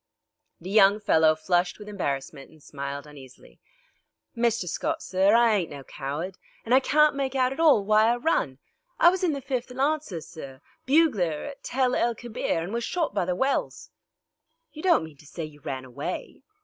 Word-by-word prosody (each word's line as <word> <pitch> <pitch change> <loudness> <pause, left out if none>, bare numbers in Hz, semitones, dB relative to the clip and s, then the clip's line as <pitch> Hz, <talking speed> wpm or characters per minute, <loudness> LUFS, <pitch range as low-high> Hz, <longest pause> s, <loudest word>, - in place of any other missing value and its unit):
The 185 +3 -8
young 205 0 +5
fellow 160 -6 +4
flushed 175 +3 0
with 210 - -11
embarrassment 140 -8 -4
and 155 -2 -20
smiled 140 0 -6
uneasily. 140 -4 -15 0.8
"Mr. 230 -5 0
Scott, 320 - -2
sir, 195 +3 +3
I 235 -1 +5
ain't 190 -5 0
no 140 -1 -9
coward, 150 +8 -6 0.3
an' 235 - 0
I 260 - +7
can't 300 +2 +3
make 275 -1 -2
it - - +1
out 255 0 +2
at 270 - -11
all 295 -11 +5
why 215 +1 +4
I - - +1
run. 240 - 0 0.4
I 345 - +8
was 370 +1 -2
in 340 -4 +2
the 280 - -4
5th 260 -2 -3
Lawncers, 275 - -1
sir, 135 -4 -10 0.3
bugler 235 - +2
at 280 -1 -9
Tel 255 -1 0
el 235 -1 +1
Kebir, 220 -7 -3
an' 185 +6 -6
was 235 0 -2
shot 330 - -1
by 200 -3 0
the 180 0 -1
wells." 270 +8 -2 0.8
"You 310 - -8
don't 350 - +3
mean 160 -3 -11
to 150 - -18
say 165 +2 -6
you 150 -1 -14
ran 130 -1 -5
away?" 125 -2 -6
205 Hz, 190 wpm, -26 LUFS, 155-265 Hz, 0.8 s, I